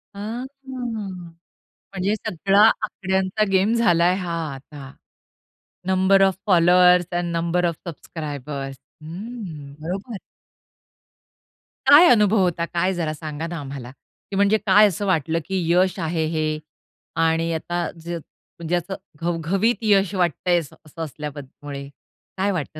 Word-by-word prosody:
आ, -, -, -8 dB
हां, 230 Hz, +5 st, -4 dB, 1.5 s
म्हणजे 195 Hz, +2 st, 0 dB
सगळा 195 Hz, 0 st, +1 dB, 0.2 s
आकड्यांचा 190 Hz, 0 st, -1 dB
गेम 195 Hz, +4 st, +3 dB
झालाय 180 Hz, -6 st, +3 dB
हा 180 Hz, -3 st, -4 dB, 0.2 s
आता. 135 Hz, 0 st, -11 dB, 1.0 s
Number 190 Hz, +1 st, +4 dB
of 190 Hz, -1 st, +3 dB
followers 180 Hz, -1 st, +5 dB
end 175 Hz, -1 st, -1 dB
number 170 Hz, +1 st, 0 dB
of 170 Hz, -1 st, 0 dB
subscribers. 145 Hz, -4 st, -6 dB, 0.3 s
हम्म. 170 Hz, -4 st, -8 dB
बरोबर. 195 Hz, +7 st, -4 dB, 1.7 s
काय 310 Hz, +5 st, +9 dB
अनुभव 210 Hz, -2 st, +4 dB
होता? 170 Hz, -2 st, 0 dB
काय 175 Hz, +2 st, 0 dB
जरा 165 Hz, -4 st, -2 dB
सांगा 155 Hz, +1 st, -6 dB
ना 170 Hz, 0 st, -5 dB
आम्हाला, 135 Hz, -3 st, -7 dB
की 195 Hz, +7 st, -13 dB
म्हणजे 200 Hz, +2 st, +4 dB
काय 210 Hz, 0 st, +5 dB
असं 200 Hz, +1 st, -3 dB
वाटलं, 165 Hz, -3 st, +1 dB
की 190 Hz, -2 st, -1 dB
यश 185 Hz, +2 st, +3 dB
आहे 160 Hz, -1 st, -1 dB
हे 155 Hz, -1 st, -1 dB, 0.7 s
आणि 165 Hz, +1 st, +1 dB
आता 170 Hz, +1 st, -2 dB, 0.2 s
ज -, -, -7 dB, 0.5 s
म्हणजे 170 Hz, +1 st, -1 dB
असं 175 Hz, +2 st, -3 dB, 0.2 s
घवघवीत 175 Hz, +7 st, +1 dB
यश 200 Hz, -3 st, +3 dB
वाटतय 175 Hz, 0 st, +1 dB
असं 155 Hz, 0 st, -11 dB
असल्याब 150 Hz, -1 st, -7 dB, 0.3 s
मुळे 140 Hz, -1 st, -6 dB, 0.5 s
काय 195 Hz, +2 st, +1 dB
वाटतं? 155 Hz, -3 st, -4 dB
175 Hz, 125 wpm, -22 LUFS, 160-195 Hz, 1.7 s, काय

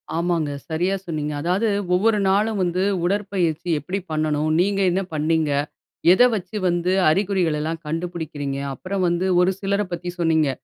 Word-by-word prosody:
ஆமாங்க. 170 Hz, -3 st, 0 dB, 0.2 s
சரியா 180 Hz, +5 st, 0 dB
சொன்னீங்க. 150 Hz, -3 st, -3 dB
அதாவது, 185 Hz, +7 st, +1 dB, 0.2 s
ஒவ்வொரு 210 Hz, +3 st, +3 dB
நாளும் 210 Hz, +2 st, +1 dB
வந்து 180 Hz, +1 st, 0 dB, 0.2 s
உடற்பயிற்சி 180 Hz, -4 st, -1 dB
எப்படி 185 Hz, +7 st, -4 dB
பண்ணனும்? 155 Hz, 0 st, 0 dB
நீங்க 195 Hz, +2 st, +1 dB
என்ன 190 Hz, +2 st, 0 dB
பண்ணினீங்க? 155 Hz, 0 st, +1 dB, 0.6 s
எதை 245 Hz, +6 st, +6 dB
வச்சு 195 Hz, +2 st, -5 dB
வந்து 175 Hz, +1 st, +1 dB, 0.2 s
அறிகுறிகள் 180 Hz, -3 st, +1 dB
எல்லாம் 160 Hz, +2 st, -3 dB
கண்டுபிடிக்கிறீங்க? 155 Hz, -4 st, -4 dB, 0.2 s
அப்புறம் 190 Hz, +6 st, -4 dB
வந்து 175 Hz, +2 st, 0 dB
ஒரு 180 Hz, +1 st, +4 dB
சிலரைப் 200 Hz, -1 st, -1 dB
பத்தி 175 Hz, 0 st, -4 dB
சொன்னீங்க. 160 Hz, -4 st, +2 dB
175 Hz, 140 wpm, -22 LUFS, 160-195 Hz, 0.6 s, எதை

